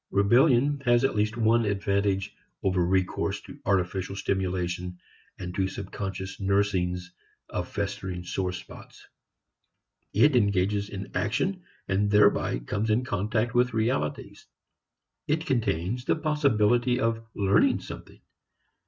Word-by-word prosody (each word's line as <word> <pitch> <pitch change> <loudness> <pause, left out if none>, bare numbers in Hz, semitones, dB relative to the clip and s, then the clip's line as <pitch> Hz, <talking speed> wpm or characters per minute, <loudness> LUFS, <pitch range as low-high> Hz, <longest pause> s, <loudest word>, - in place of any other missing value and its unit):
Rebellion 125 +7 +4
has 120 0 +4
at 135 - +2
least 105 +2 0
one 115 +1 +3
advantage 100 -1 0 0.3
over 95 -2 +2
recourse 95 +1 0
to - - -12
artificial 95 0 0
stimulation 90 -2 -2 0.4
and 90 -1 -6
to 95 0 0
subconscious 95 0 -6
nursings 95 -3 0 0.4
of 90 0 -3
festering 95 -3 -4
sore 90 +1 -2
spots. 95 +2 -11 1.1
It 135 +7 +4
engages 100 -2 +1
in 95 -1 -7
action 190 -1 0 0.3
and 100 +2 +1
thereby 105 -10 +4
comes 100 - -3
in 115 +4 +2
contact 110 +1 -1
with 125 -1 +2
realities. 110 -10 -2 0.8
It 160 +2 0
contains 115 - -1
the - - +2
possibility 125 -6 +2
of 115 -1 0
learning 100 -1 +3
something. - - -10
100 Hz, 120 wpm, -27 LUFS, 95-115 Hz, 1.1 s, Rebellion